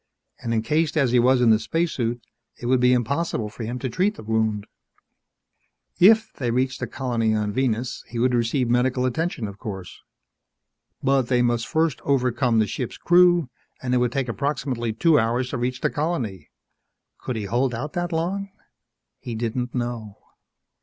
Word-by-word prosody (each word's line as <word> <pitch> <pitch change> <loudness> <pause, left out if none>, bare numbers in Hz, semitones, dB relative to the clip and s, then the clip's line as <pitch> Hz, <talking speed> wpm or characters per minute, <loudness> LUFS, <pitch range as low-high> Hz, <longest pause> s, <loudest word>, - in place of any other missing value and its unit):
And 115 - -3
encased 150 +8 +1
as 135 -5 +3
he 125 - +4
was 125 +1 +4
in 120 -2 +5
the 110 - +4
spacesuit, 125 -7 -1 0.4
it - - -8
would 130 +1 +3
be 125 0 +4
impossible 125 -1 0
for 115 - -8
him 120 +3 -3
to 130 - -3
treat 190 - 0
the - - -10
wound. 110 -1 0 1.3
If 220 +4 +6
they 125 -3 -3
reached 130 +2 0
the 125 - -3
colony 115 -3 0
on 105 -1 -1
Venus 125 0 -1
he 120 - -7
would 125 +2 +2
receive 120 +2 +1
medical 125 +1 +1
attention, 130 -2 -1
of 100 0 -10
course. 95 -4 -7 1.0
But 135 -2 +2
they 125 -1 +2
must 120 -1 0
first 160 0 0
overpower 125 -3 +1
the 110 - +4
ship's 120 +4 -5
crew, 175 -5 +4 0.3
and 125 -1 -2
it - - +4
would 125 -1 +1
take 135 0 -1
approximately 125 -2 -2
two 150 +7 +3
hours 120 +3 0
to 130 - -3
reach 125 +1 -2
the - - +1
colony. 145 - -3 0.7
Could 125 - -4
he 110 - -3
hold 120 +4 0
out 145 +6 -5
that 175 0 -2
long? 185 +5 -2 0.7
He 120 - -6
didn't 120 +2 -3
know. 120 -4 -4
125 Hz, 175 wpm, -24 LUFS, 115-140 Hz, 1.3 s, If